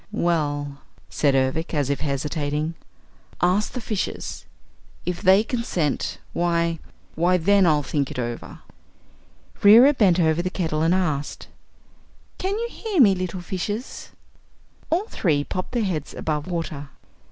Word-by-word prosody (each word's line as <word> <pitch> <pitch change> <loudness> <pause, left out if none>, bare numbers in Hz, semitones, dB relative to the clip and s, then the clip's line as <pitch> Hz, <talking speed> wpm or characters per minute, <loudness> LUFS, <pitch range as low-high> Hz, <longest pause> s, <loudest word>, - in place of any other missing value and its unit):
"Well," 145 -4 -1 0.3
said 140 -2 +2
Ervic, 135 +6 0
as 140 -2 +1
if 140 - -1
hesitating, 150 +2 -2 0.7
"ask 185 +4 +1
the 250 - -3
fishes. 215 -3 -4 0.6
If 180 -1 -3
they 195 +1 +5
consent, 225 - -2 0.2
why 170 -1 0 0.3
why, 175 +3 +2
then, 195 +2 +4
I'll 150 -2 +3
think 140 -1 -1
it - - -7
over." 120 -1 -5 1.0
Reera 235 +8 +8
bent 190 -9 +3
over 160 0 +2
the 185 - -2
kettle 160 -5 -2
and 165 +3 +3
asked: 155 -6 -2 0.9
"Can 390 +2 -1
you 470 +1 -2
hear 425 -6 -3
me, 210 -7 +7
little 185 0 -4
fishes?" 205 +6 -5 0.8
All 350 +6 +1
three 150 - 0
popped 185 +8 -5
their 240 -2 +1
heads 165 -7 -3
above 150 0 -2
water. 165 -5 -4
170 Hz, 135 wpm, -23 LUFS, 150-195 Hz, 1.0 s, Reera